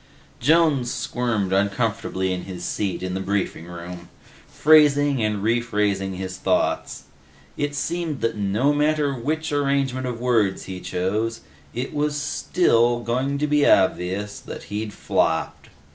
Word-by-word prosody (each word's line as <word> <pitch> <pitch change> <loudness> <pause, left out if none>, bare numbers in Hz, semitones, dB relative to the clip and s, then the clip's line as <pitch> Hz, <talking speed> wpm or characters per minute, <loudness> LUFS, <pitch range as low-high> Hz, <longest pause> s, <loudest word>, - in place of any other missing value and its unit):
Jones 150 -3 +3
squirmed 110 -6 -1
uncomfortably 100 -2 0
in 90 - -5
his 90 -2 -6
seat 95 -2 -2
in 90 0 -3
the 95 - -2
briefing 95 -3 -2
room, 85 0 -9 0.4
phrasing 145 -3 +4
and 105 -2 -1
rephrasing 105 -4 0
his 95 0 -5
thoughts. - - 0 0.5
It 145 0 -2
seemed 165 -1 -2
that 115 - 0
no 105 +8 +1
matter 150 -1 +1
which 150 +6 -2
arrangement 140 -3 0
of 120 -2 -4
words 115 -6 +1
he 95 -1 -7
chose, 105 +6 -2 0.3
it 125 +3 -3 0.2
still 145 -4 +2
was 120 - -9
going 130 +4 0
to 150 - 0
be 150 -1 +2
obvious 95 +2 +1
that - - -9
he'd 105 0 -3
flopped. 80 -4 -1
115 Hz, 135 wpm, -23 LUFS, 95-140 Hz, 0.5 s, phrasing